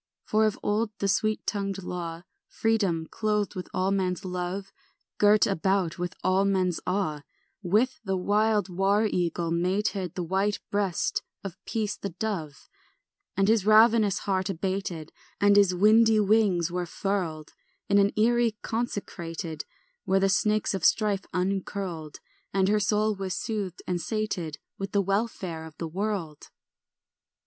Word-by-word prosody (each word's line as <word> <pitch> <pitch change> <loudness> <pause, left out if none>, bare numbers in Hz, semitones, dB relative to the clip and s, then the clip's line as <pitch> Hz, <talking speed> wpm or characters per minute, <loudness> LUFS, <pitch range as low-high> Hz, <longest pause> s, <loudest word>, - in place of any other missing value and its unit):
For 215 0 +2
of 215 - -2
old 210 +2 +1
the 200 - -1
sweet 215 +2 +1
tongued 195 -2 -2
law, 170 -2 -5 0.2
Freedom, 200 -8 0
clothed 210 -2 0
with 185 -2 -6
all 185 +1 0
men's 185 -2 -1
love, 180 +2 -4 0.5
Girt 210 0 +5
about 190 -2 0
with 180 0 -3
all 190 +1 +3
men's 185 -3 +1
awe, 180 -6 -1 0.4
With 215 +8 +1
the 195 -3 -1
wild 210 +2 +2
war 195 +4 +2
eagle 170 -4 -1
mated 185 +1 -1
The 180 - -2
white 195 +4 0
breast 200 -4 0 0.2
of 195 0 -8
peace 215 -2 -2
the 200 - -4
dove, 175 - -5 0.7
And 195 0 +3
his 220 -2 +3
ravenous 215 -1 +5
heart 190 -1 0
abated 185 -3 -3 0.3
And 205 0 +5
his 200 -3 +5
windy 220 +3 +5
wings 200 -5 +3
were 180 0 -2
furled 170 -5 -3 0.3
In 200 0 +4
an 200 0 +4
eyrie 230 0 +3
consecrated 175 -8 -4 0.4
Where 190 0 +3
the 195 0 +2
snakes 210 +3 +2
of 190 -4 -3
strife 205 -1 +2
uncurled, 185 -4 -3 0.3
And 195 0 +2
her 210 0 +3
soul 210 +1 +2
was 190 -1 -3
soothed 195 -3 -4
and 180 -1 -2
sated 195 -9 -3 0.2
With 195 0 -5
the 200 - +3
welfare 195 -5 -2
of 160 -1 -12
the 165 - -4
world. 180 -4 -4
195 Hz, 145 wpm, -27 LUFS, 180-210 Hz, 0.7 s, Girt